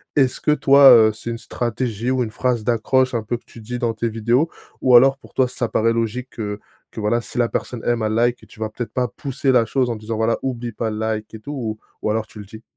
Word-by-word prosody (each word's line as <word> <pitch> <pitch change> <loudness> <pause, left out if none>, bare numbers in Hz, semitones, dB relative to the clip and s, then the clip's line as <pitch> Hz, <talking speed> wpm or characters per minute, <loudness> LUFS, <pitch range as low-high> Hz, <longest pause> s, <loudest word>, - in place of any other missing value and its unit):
Est-ce 135 -3 +2
que - - -1
toi, 140 -2 +7
heu, 110 -2 +7
c'est 110 - -7
une 115 - -3
stratégie 120 -1 -3
ou 130 -1 +1
une 110 - -5
phrase 120 0 -1
d'accroche, 130 +3 +1
un 115 - 0
peu, 120 +2 -2
que - - -25
tu 115 - -13
dis 125 +3 -5
dans 120 -2 -1
tes 115 +1 -2
vidéos, 120 +8 +1 0.3
ou 125 -2 +5
alors, 135 +2 +6
pour - - -18
toi, 130 -1 +3
ça 125 -1 -3
paraît 115 +1 +2
logique 115 +2 -2
que 105 -2 -5 0.3
que - - -8
voilà 115 +3 +1
si 110 - -9
la 120 -1 +3
personne 120 -3 -4
aime, 120 -1 +1
elle 110 0 0
like? 120 +1 0
Tu - - -17
vas 110 - -2
peut-être 120 +2 -6 0.2
pousser 135 -1 -1
la 125 -2 +4
chose 130 -3 0
en 115 - -2
disant, 110 +1 -5
voilà: 115 +1 +1
«Oublie 120 -3 -3
pas 110 +1 -3
le 105 - -4
like 110 -1 -3
et - - -8
tout» 140 - -8
ou 115 -6 -4 0.2
ou 105 - -1
alors 110 +1 0
tu 110 - -13
le 105 - -8
dis? 110 +3 -12
115 Hz, 265 wpm, -21 LUFS, 110-125 Hz, 0.3 s, toi